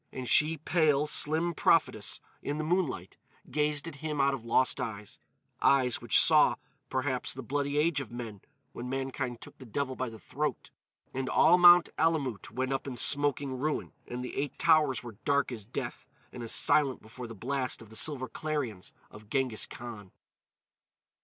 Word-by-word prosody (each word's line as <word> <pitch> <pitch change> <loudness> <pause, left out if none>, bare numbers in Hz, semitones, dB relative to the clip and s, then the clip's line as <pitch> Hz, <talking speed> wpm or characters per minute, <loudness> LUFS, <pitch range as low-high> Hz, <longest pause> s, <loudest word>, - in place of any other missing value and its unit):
And 130 -1 -6
she, 155 +5 +4
pale, 155 -2 +2
slim 160 +3 +1
prophetess, - - +1 0.2
in 145 - -3
the 155 - -2
moonlight, 155 - -1 0.3
gazed 150 +1 0
at 155 -3 -8
him 150 0 -4
out 140 0 +3
of 130 -4 -5
lost 115 +2 +2
eyes—eyes 115 +4 -1
which - - +4
saw, - - +5 0.3
perhaps, 130 -2 -1
the 135 - -7
bloody 145 +3 -2
age 150 -1 +2
of 120 - -9
men 115 -5 -7 0.3
when 125 +1 -6
mankind 130 -2 -3
took - - -12
the 130 - -10
devil 130 +3 -2
by 130 -1 -3
the 110 - -10
throat 105 - -4 0.4
and 130 0 -3
all 175 +2 +5
Mount 175 -1 +8
Alamout 140 - 0
went 130 +1 -2
up 135 - -3
in 130 -3 -5
smoking 140 0 +1
ruin; 150 +3 -2
and 125 +1 -5
the - - -7
Eight 140 0 -3
Towers 155 -6 +3
were 115 -4 -10
dark 140 -1 +1
as 110 -5 -6
death 120 - -6 0.2
and 125 - -8
as 115 - -2
silent 140 -4 +2
before 115 +3 -9
the 115 - -9
blast 130 +4 -3
of 110 -2 -14
the - - -11
silver 130 +1 0
clarions 140 - -4 0.2
of 105 0 -14
Ghenghis 130 -3 0
Khan. 110 -5 -9
135 Hz, 170 wpm, -30 LUFS, 120-150 Hz, 0.4 s, Mount